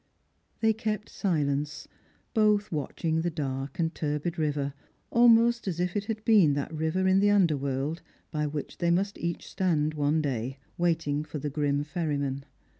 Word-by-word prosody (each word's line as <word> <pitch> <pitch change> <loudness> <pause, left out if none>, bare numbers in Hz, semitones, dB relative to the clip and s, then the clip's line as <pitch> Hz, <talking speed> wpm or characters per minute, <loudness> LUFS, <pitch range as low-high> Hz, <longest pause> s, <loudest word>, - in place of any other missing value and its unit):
They 220 -1 +4
kept 215 -1 -3
silence, 150 -6 -1 0.5
both 210 -1 +3
watching 160 +1 -1
the 175 - 0
dark 135 -4 -4
and 165 -1 0
turbid 150 +3 -2
river, 145 -2 -1 0.4
clmost 235 -1 +5
as 175 -3 -2
if 180 0 -1
it 205 0 -1
had 215 0 -4
been 200 -10 +6
that 145 +3 -3
river 160 +4 0
in 190 +1 +5
the 205 +1 +4
under 190 -7 +4
world 140 +4 -2 0.3
by 150 -1 -1
which 145 0 -5
they 170 - +1
must 195 +4 +1
each 170 0 -3
stand 155 -5 0
one 150 +1 +1
day, 135 -3 -2 0.2
waiting 165 -4 0
for 155 0 -6
the 145 0 -3
grim 145 0 0
ferryman. 145 -3 -2
160 Hz, 165 wpm, -28 LUFS, 145-190 Hz, 0.5 s, been